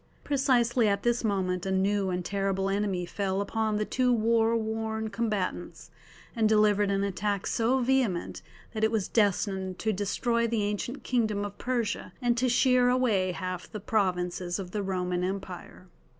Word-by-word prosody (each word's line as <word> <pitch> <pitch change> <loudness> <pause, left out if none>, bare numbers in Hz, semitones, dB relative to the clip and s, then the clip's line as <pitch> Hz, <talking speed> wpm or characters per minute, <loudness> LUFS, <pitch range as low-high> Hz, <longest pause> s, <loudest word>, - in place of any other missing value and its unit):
Precisely 250 -4 +2
at 200 -1 0
this 240 0 +1
moment 185 -4 0
a 195 - -3
new 195 +1 +1
and 180 -1 -2
terrible 195 -1 -1
enemy 195 -3 -1
fell 190 +1 -2
upon 215 +1 -1
the 210 0 0
two 250 +2 +1
war 230 0 +3
worn 220 0 -3
combatants, 215 -6 -3 0.4
and 220 -2 +2
delivered 210 -1 +3
an 195 0 +1
attack 200 +1 -1
so 235 +3 +1
vehement 250 -8 0 0.3
that 220 -1 -3
it 220 - +4
was 220 -4 -1
destined 195 -3 0
to 220 0 -1
destroy 235 +4 0
the 225 -2 0
ancient 210 +6 -3
kingdom 215 -5 0
of 205 0 -7
Persia 240 -4 -2
and 240 -2 +1
to 250 +2 +1
shear 250 0 +4
away 225 -8 +2
half 185 0 -5
the 215 - -5
provinces 180 -4 -1
of 185 -3 -6
the 210 - -2
Roman 180 -2 -1
Empire. 185 -1 -6
210 Hz, 165 wpm, -28 LUFS, 190-230 Hz, 0.4 s, it